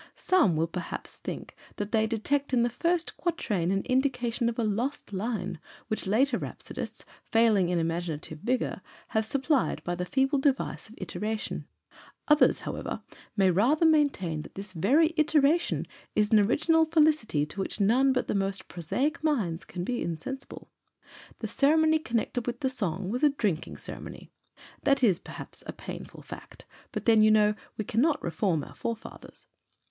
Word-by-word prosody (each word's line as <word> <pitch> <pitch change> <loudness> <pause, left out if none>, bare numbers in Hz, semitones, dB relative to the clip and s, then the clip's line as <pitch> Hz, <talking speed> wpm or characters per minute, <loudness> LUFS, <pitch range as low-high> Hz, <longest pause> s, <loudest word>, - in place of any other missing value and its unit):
Some 225 - +3
will 160 +1 +2
perhaps 170 +1 -6
think - - -7 0.2
that 205 0 -4
they 220 -1 +3
detect 265 +5 -1
in 235 - +4
the 240 - +1
first 340 +5 0
quatrain 215 - -1
an 195 +1 +1
indication 250 -2 +1
of 230 - -5
a 235 - +1
lost 225 +3 -2
line, 195 -4 -3 0.3
which 215 -2 -2
later 245 +8 +3
rhapsodists, - - -7 0.2
failing 220 -6 +3
in 180 - +1
imaginative 165 -2 -3
vigour, 250 +8 -1 0.3
have 220 0 +1
supplied 275 +2 +1
by 175 - -2
the 175 +1 -2
feeble 270 +8 +1
device 270 -4 0
of 225 - -14
iteration; 215 +1 -4 0.6
others, 300 0 +5
however, - - -5 0.3
may 190 -2 +5
rather 255 - +3
maintain 280 - +2
that - - -12
this 195 0 -7
very 285 - +3
iteration 310 +1 +3 0.3
is 210 -1 +2
an 215 - +7
original 320 +10 +3
felicity 305 - +3
to 150 - -9
which 195 - -3
none 245 +7 +4
but 255 -1 0
the - - 0
most 195 -1 -1
prosaic 250 - -2
minds 210 - 0
can 175 - -6
be 245 +5 -2
insensible. 170 - -6 0.7
The - - -4
ceremony 315 +2 +3
connected 240 -2 -2
with 240 0 -3
the 265 - +1
song 190 -5 -2
was 250 +3 -2
a 300 - +6
drinking 210 - -2
ceremony. - - -9 0.5
(That 275 -2 +2
is 190 -7 +4
perhaps - - -10
a - - -4
painful - - -9
fact, - - -11 0.3
but - - -4
then, 225 -2 +6
you 215 - +6
know, 210 -1 +5 0.2
we 215 - -2
cannot 285 +10 +2
reform 170 -3 0
our - - -10
forefathers.) 230 -1 -7
230 Hz, 160 wpm, -28 LUFS, 195-275 Hz, 0.7 s, an